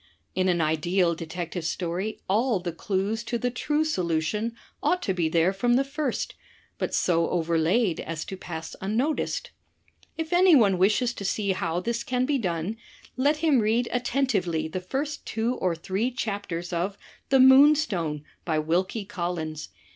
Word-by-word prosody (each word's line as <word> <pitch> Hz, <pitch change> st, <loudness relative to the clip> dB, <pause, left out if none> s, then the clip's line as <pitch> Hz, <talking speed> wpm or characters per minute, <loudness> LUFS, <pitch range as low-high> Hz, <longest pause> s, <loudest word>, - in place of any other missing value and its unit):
In 185 Hz, 0 st, +1 dB
an 175 Hz, -2 st, +2 dB
ideal 170 Hz, +3 st, +2 dB
detective 170 Hz, +1 st, -5 dB
story 180 Hz, +5 st, -3 dB
all 220 Hz, +2 st, +2 dB
the 175 Hz, -1 st, -4 dB
clues 200 Hz, +6 st, -2 dB
to 235 Hz, -, -1 dB
the 245 Hz, +1 st, -1 dB
true 300 Hz, +5 st, 0 dB
solution 210 Hz, -, -1 dB, 0.3 s
ought 360 Hz, 0 st, +1 dB
to 190 Hz, -, 0 dB
be 170 Hz, -3 st, 0 dB
there 170 Hz, +3 st, +3 dB
from 240 Hz, +5 st, +2 dB
the 265 Hz, -, +3 dB
first, 275 Hz, -2 st, -3 dB, 0.5 s
but -, -, -1 dB
so 170 Hz, -2 st, +2 dB
overlaid 170 Hz, +4 st, +1 dB
as 160 Hz, -1 st, -4 dB
to 190 Hz, -, -6 dB
pass 165 Hz, -3 st, -7 dB
unnoticed. 235 Hz, +11 st, -1 dB, 0.7 s
If 320 Hz, +1 st, -3 dB
anyone 290 Hz, -, +5 dB
wishes 215 Hz, +6 st, +3 dB
to 200 Hz, -, -7 dB
see 200 Hz, 0 st, 0 dB
how 175 Hz, -2 st, -1 dB
this 235 Hz, +4 st, -2 dB
can 250 Hz, +1 st, 0 dB
be 280 Hz, 0 st, +1 dB
done, 180 Hz, +1 st, -2 dB, 0.4 s
let 285 Hz, +4 st, +2 dB
him 290 Hz, -5 st, +5 dB
read 225 Hz, +2 st, +1 dB
attentively 230 Hz, -, 0 dB
the 180 Hz, +3 st, -4 dB
first 280 Hz, +10 st, -3 dB
two 225 Hz, +3 st, 0 dB
or 180 Hz, -2 st, 0 dB
three 190 Hz, +8 st, -1 dB
chapters 200 Hz, -8 st, -4 dB
of 185 Hz, +4 st, -1 dB, 0.3 s
*The 270 Hz, -, +5 dB
Moonstone,' 260 Hz, -, +5 dB, 0.2 s
by 160 Hz, -3 st, 0 dB
Wilkie 180 Hz, +7 st, 0 dB
Collins. 165 Hz, -4 st, -4 dB
195 Hz, 155 wpm, -26 LUFS, 170-245 Hz, 0.7 s, anyone